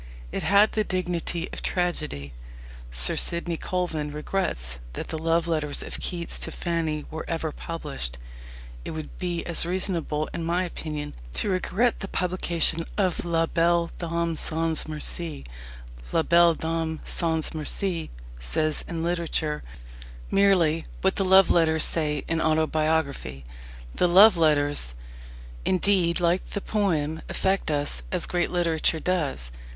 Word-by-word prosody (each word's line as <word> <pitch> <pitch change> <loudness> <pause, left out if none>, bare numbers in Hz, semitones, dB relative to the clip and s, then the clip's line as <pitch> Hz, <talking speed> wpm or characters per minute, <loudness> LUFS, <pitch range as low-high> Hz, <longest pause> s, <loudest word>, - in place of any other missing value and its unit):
It - - -2
had 200 +5 +5
the 215 - +1
dignity 175 -2 -2
of - - -4
tragedy. 150 - -2 0.6
Sir - - +2
Sidney 170 0 +2
Colvin 165 -4 -2
regrets 150 - -3
that - - -5
the 160 - -3
love 165 +1 +2
letters 155 -3 -1
of - - -6
Keats 170 -2 -1
to - - -3
Fanny 160 -3 -2
were 160 +1 -4
ever 165 -1 -2
published. 145 - -5 0.7
It 160 - -5
would 155 - -7
be 175 -2 -2
as 170 - +4
reasonable, 170 -4 -1
in 170 - -3
my 175 +2 +1
opinion, 155 -4 -5 0.2
to 200 - 0
regret 205 +6 +1
the 195 - -4
publication 170 -3 0
of 185 -4 +1
La 165 -1 +1
Belle 170 0 +2
Dame 170 -1 -1
sans 160 0 -1
Merci. 155 - -4 0.7
La 165 - +2
Belle 170 0 +5
Dame 160 -1 -2
sans 160 -2 0
Merci 165 +2 -1 0.3
says 150 - 0
in 165 -1 -3
literature 165 -3 -1 0.7
merely 175 -5 +3 0.2
what 190 0 +1
the 195 - +2
love 190 -1 +6
letters 160 -2 +4
say 150 -3 -1
in 165 0 0
autobiography. 155 - 0 0.5
The 180 - +2
love 190 +4 +8
letters, 145 - +2 0.7
indeed, 185 -2 +2
like 175 +1 +2
the 200 - -3
poem, 160 -8 0
affect 190 -2 0
us 145 - 0
as - - 0
great 175 -1 0
literature 165 -2 +1
does. 145 - -1
165 Hz, 135 wpm, -26 LUFS, 155-175 Hz, 0.7 s, love